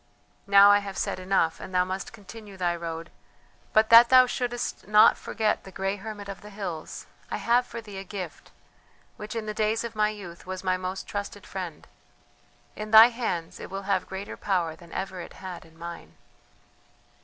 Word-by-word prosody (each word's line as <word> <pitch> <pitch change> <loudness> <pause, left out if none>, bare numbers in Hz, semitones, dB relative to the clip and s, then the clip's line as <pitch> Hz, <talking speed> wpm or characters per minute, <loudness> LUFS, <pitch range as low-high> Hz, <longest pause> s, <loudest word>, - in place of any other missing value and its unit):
Now 200 0 +8
I 205 - +6
have 200 -1 -7
said - - -2
enough, 185 -3 +1
and 185 - -8
thou 180 0 +4
must 185 0 -5
continue 210 -1 -12
thy 175 -2 0
road; 165 -1 -6 0.6
but 220 +1 +3
that 230 +1 +9
thou 255 -1 +8
shouldst 245 -3 -3
not 210 +2 +7
forget 215 -2 -1
the - - -11
grey 195 +2 -2
hermit 205 0 -8
of 195 -1 -7
the 210 - -11
hills, 195 -6 -6 0.2
I - - -2
have 240 +3 +2
for 235 - -7
thee 205 -3 -9
a - - -6
gift, 185 -4 -7 0.7
which, 210 +2 -7
in 225 -1 -3
the 215 - -3
days 215 +1 0
of 230 -1 -5
my 210 0 +2
youth, 185 -5 -9
was 185 0 -5
my 185 -1 +2
most 185 +1 -4
trusted 205 0 -6
friend. 180 -5 -7 0.9
In 215 0 -6
thy 220 +2 +10
hands 225 -9 -4
it - - -8
will 195 +1 -5
have 195 -1 -1
greater 190 +1 -6
power 175 -5 -1
than 170 -2 -16
ever 190 -1 -4
it - - -10
had 185 -3 -8
in 165 0 -20
mine." 170 +1 -9
195 Hz, 190 wpm, -27 LUFS, 185-215 Hz, 0.9 s, thy